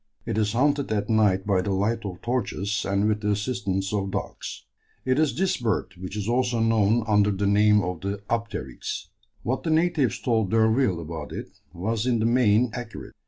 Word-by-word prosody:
It 115 - -2
is 105 -1 +1
hunted 140 +1 +1
at 105 +1 0
night 105 -4 +3
by 100 -3 +2
the 100 - -3
light 105 +4 0
of 95 0 -6
torches 105 -5 -1
and 100 +2 +2
with 105 -1 0
the 105 - -1
assistance 100 -2 -1
of 100 -2 -1
dogs. - - -5 0.4
It 130 +2 +2
is 155 -6 +2
this 190 +1 +1
bird 110 -5 -1
which 95 +3 -7
is 105 0 -3
also 120 0 +1
known 115 0 +3
under 105 -2 +3
the 100 0 -1
name 105 +1 +4
of 90 -2 -4
the 100 +1 -3
"apteryx." 110 - -4 0.3
What 130 +3 -1
the 165 - -3
natives 155 - +2
told 110 -5 +1
D'Urville 110 -2 +3
about 80 -2 -6
it - - -6 0.2
was 110 +6 -2
in 120 -2 +2
the 110 - 0
main 115 -1 +3
accurate. 120 -2 -7
105 Hz, 190 wpm, -25 LUFS, 100-120 Hz, 0.4 s, name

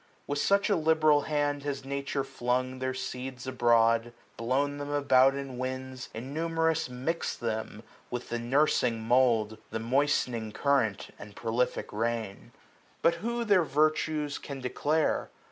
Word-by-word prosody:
With 145 0 -2
such 200 +5 +3
a 205 - +3
liberal 155 -2 +4
hand 145 -1 0
has 140 -1 -4
nature 140 0 -2
flung 130 -1 -2
Their 130 0 -2
seeds 130 0 -5
abroad; 120 -2 +3 0.2
blown 140 +5 0
them 145 0 -5
about 135 -2 +4
in 135 -3 -6
winds, 130 0 -4
230 115 +3 -5
Innumerous 160 +1 0
mix'd 130 +7 -3
them 110 -1 -4 0.3
with 125 0 -5
the 120 - -2
nursing 120 -2 +2
mould. 115 -3 +2
The 110 - -3
moistening 120 -3 0
current, 115 -6 +1
and 105 -1 -11
prolific 115 +1 -1
rain. 110 -2 -3 0.5
But 165 - +5
who 235 +2 -1
their 205 -5 +4
virtues 150 0 0
can 140 -1 -7
declare 150 +5 0
130 Hz, 140 wpm, -29 LUFS, 120-145 Hz, 0.5 s, But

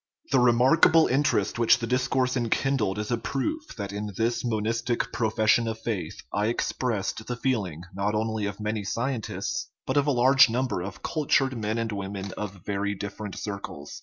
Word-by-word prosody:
The 135 - +5
remarkable 130 +7 +5
interest 135 -2 +1
which 115 - +5
the 115 - -3
discourse 130 +1 +1
en 120 -3 0
kindled 110 -9 +1
is 105 +2 -3
a 120 - +1
proof 215 - -3
that 100 -1 -4
in 105 +1 -4
this 115 +1 0
monistic 115 +1 -1
profession 110 +1 +2
of 110 0 -2
faith 110 -4 -4 0.2
I 105 +1 +1
expressed 115 -2 -2
the 125 - -2
feeling 105 - -1
not 100 +2 -1
only 110 -1 -1
of 100 0 -6
many 105 0 -2
scientists, 115 +3 -3 0.2
but - - 0
of 145 0 +3
a - - +4
large 130 +1 +6
number 125 -4 -1
of 95 -1 -7
cultured 135 -3 +1
men 110 0 -2
and 115 -1 -1
women 100 -1 -4
of 95 -3 -6
very 100 0 -1
different 100 +1 -6
circles. 100 -8 -6
115 Hz, 175 wpm, -26 LUFS, 105-125 Hz, 0.2 s, large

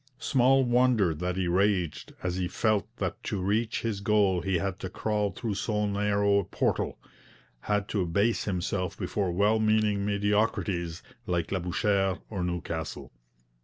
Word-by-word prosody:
Small 135 +1 +3
wonder 120 -7 +3
that 90 +3 -3
he 95 -2 0
raged 90 -2 0
as 90 0 -1
he 90 -1 -1
felt 110 +2 +1
that - - -3
to 100 - -2
reach 110 +5 0
his 110 -4 -1
goal 100 -3 +3
he 95 +1 0
had 95 +1 -3
to 95 - -5
crawl 105 +1 -1
through 110 +3 -4
so 105 +1 -1
narrow 100 0 +2
a - - 0
portal, - - -1 0.6
had 105 +7 -1
to 100 - 0
abase 100 +7 +1
himself 90 0 -2
before 100 -4 -1
well 105 +5 +2
meaning 110 -2 +2
mediocrities 100 -4 0 0.2
like 85 -2 -1
Labouchere 95 +1 +1
or 95 -4 -2
Newcastle. 85 -3 -4
100 Hz, 150 wpm, -28 LUFS, 90-105 Hz, 0.6 s, Small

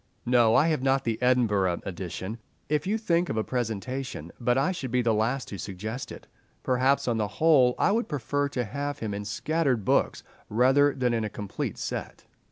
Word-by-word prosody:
No, 120 -2 +4
I 160 - +5
have 155 -5 0
not 135 0 +2
the 115 -2 -2
Edinburgh 105 -8 +2
edition. 95 +4 -5 0.3
If 150 +2 0
you 215 +3 +1
think 175 -5 +1
of 110 - -2
a 110 - +1
presentation—but 120 - -3
I 140 +7 +2
should 170 -8 -4
be 125 +1 +1
the 115 -1 +2
last 115 +5 0
to 100 - -7
suggest 110 +8 -5
it. - - -10 0.4
Perhaps 130 +2 +2
on 120 -2 +1
the 105 -2 0
whole 140 -6 +5
I - - +3
would 230 +3 0
prefer 145 0 -1
to 125 -3 -2
have 145 +6 -4
him 110 -6 -4
in 100 0 -5
scattered 130 0 0
books, - - +1 0.3
rather 135 +5 +4
than 125 -2 +1
in 115 -1 0
a 110 - -2
complete 100 -1 -5
set. - - -5
125 Hz, 190 wpm, -27 LUFS, 110-140 Hz, 0.4 s, I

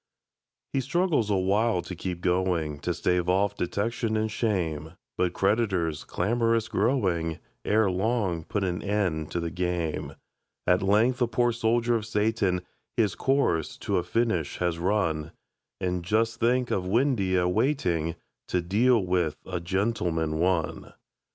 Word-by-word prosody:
He 135 - +2
struggles 150 - +1
awhile 100 0 +2
to 95 - -7
keep 90 0 -4
going, 90 -5 0
To - - -2
stave 90 0 0
off 95 +2 +2
detection 110 +4 -1
and 110 0 -1
shame; 85 -8 -1 0.2
But 90 -1 0
creditors, 95 -6 0
clamorous 115 +3 +1
growing, 95 - 0 0.3
Ere 105 -2 +3
long 95 -3 0
put 100 +5 -2
an 90 -2 -1
end 95 -7 -1
to 85 - -2
the 85 -1 -3
game. 90 -2 -2 0.5
At 90 0 +3
length 110 +6 +3
the 120 - +3
poor 120 +1 +2
soldier 115 +1 +1
of 110 -2 -1
Satan 105 -4 +1 0.3
His 105 -6 +2
course 135 - +1
to - - -1
a 90 - +1
finish 90 -4 0
has 85 -2 -1
run 85 -5 0 0.5
And 90 -1 -1
just 115 +5 +1
think 125 +1 +2
of 95 - 0
Windeyer 100 -6 +2
waiting 90 - 0 0.3
To 90 - 0
deal 105 +5 +3
with 90 -4 0
"A 90 -2 -3
Gentleman, 85 -4 -1
One"! 90 -2 0
95 Hz, 140 wpm, -27 LUFS, 90-115 Hz, 0.5 s, Ere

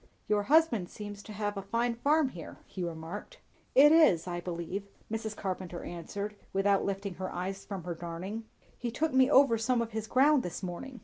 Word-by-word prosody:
"Your 210 -1 +2
husband 245 - +3
seems 205 -1 -8
to 215 - -11
have 205 0 -2
a - - -2
fine 230 +4 0
farm 285 +4 +2
here," 170 -9 -9
he 185 - -6
remarked. 170 - -6 0.4
"It 290 +3 +8
is, 310 - +6
I 175 -1 -3
believe," 180 +3 -4 0.2
Mrs. 220 -1 -3
Carpenter 185 -2 -4
answered, 200 +5 -5 0.2
without 195 0 +3
lifting 195 0 -2
her 185 +1 -5
eyes 195 +2 -4
from 195 -4 -5
her 175 0 -3
darning. 175 +6 -6 0.3
"He 240 - -2
took 305 +6 -1
me 260 0 +5
over 270 -5 +6
some 245 +2 +2
of 230 -1 -2
his 220 0 -4
ground 275 +4 +5
this 180 -1 -6
morning. 235 +9 -6
205 Hz, 190 wpm, -31 LUFS, 180-240 Hz, 0.4 s, It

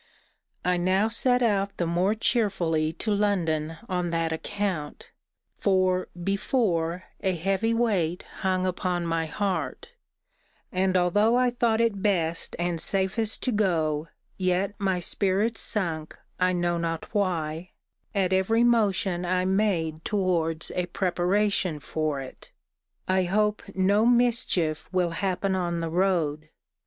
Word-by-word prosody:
I 180 0 +2
now 190 +5 +2
set 245 +2 +2
out 200 -3 0
the 175 - 0
more 180 +5 +1
cheerfully 175 -9 +1
to 210 +5 -1
London 165 -6 0
on 180 -2 -1
that 165 -1 0
account: 185 -4 -4 0.5
for, 185 -2 +2 0.2
before, 185 -4 0 0.2
a 190 -1 0
heavy 195 +6 0
weight 195 -8 0
hung 185 -1 0
upon 180 -1 -1
my 165 -1 -1
heart; 200 - -3 0.8
and 185 0 +1
although 205 +6 +3
I 250 0 +3
thought 235 -2 +1
it 225 -4 +1
best 170 -5 0
and 170 -1 -1
safest 195 +3 +1
to 255 - +1
go, 165 -7 0 0.3
yet 185 +2 +1
my 190 -2 0
spirits 200 +5 0
sunk, 165 -7 -2 0.2
I 180 0 +3
know 175 -1 0
not 165 +2 -4
why, 175 -4 -1 0.5
at 190 -2 +1
every 225 +5 +3
motion 205 -6 +2
I 180 +1 0
made 180 -5 0
towards 170 -5 0
a 180 -1 -2
preparation 180 -1 0
for 155 0 -2
it. 130 -1 -10 0.6
I 185 0 +2
hope 210 +3 +1
no 200 +4 +3
mischief 235 -10 +2
will 180 -2 +1
happen 190 +2 -1
on 175 -2 -1
the 165 -1 -3
road. 165 -4 0
185 Hz, 130 wpm, -26 LUFS, 170-205 Hz, 0.8 s, although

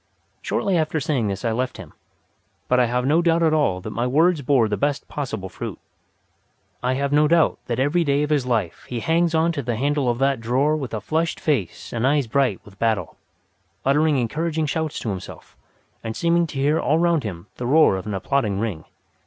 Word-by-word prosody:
Shortly 185 -4 0
after 155 0 0
saying 130 -6 0
this 100 +4 -4
I 115 - +1
left 125 +3 -2
him; - - -11 0.7
but 125 - +3
I 125 - +4
have 125 +1 -1
no 155 +5 +3
doubt 170 -1 +2
at 160 -1 +3
all 145 -13 +1
that 110 - -6
my 120 +3 -1
words 160 +4 +3
bore 130 -4 +3
the 105 - -1
best 145 +7 -1
possible 110 -9 -4
fruit. 95 - -6 1.0
I 125 +1 0
have 140 +1 -1
no 150 +1 +5
doubt 165 -1 +3
that 120 - -2
every 145 +6 +2
day 145 -1 +1
of 150 - -2
his 140 -4 +1
life 110 -9 -1
he 120 -2 -3
hangs 165 +2 +1
on 160 +1 +3
to 145 - -3
the 120 -2 -2
handle 140 +2 0
of 120 - 0
that 135 -1 +1
drawer 130 +6 +1
with 135 -6 -4
a 105 - -4
flushed 160 +9 -1
face 125 - -2
and 120 +2 +1
eyes 145 -1 +2
bright 125 -4 +1
with 100 -1 -16
battle, 115 -2 0 0.7
uttering 150 +2 +3
encouraging 155 +6 -1
shouts 160 +1 -2
to 115 - -3
himself, 95 -3 -8 0.5
and 110 -1 -4
seeming 170 0 +2
to 150 - -8
hear 145 +3 +2
all 155 - +2
round 170 -2 +2
him 90 -5 -6
the 120 - -3
roar 150 -6 +5
of 95 +2 -6
an 105 - -2
applauding 105 0 0
ring. 100 -8 -3
135 Hz, 210 wpm, -22 LUFS, 115-155 Hz, 1.0 s, no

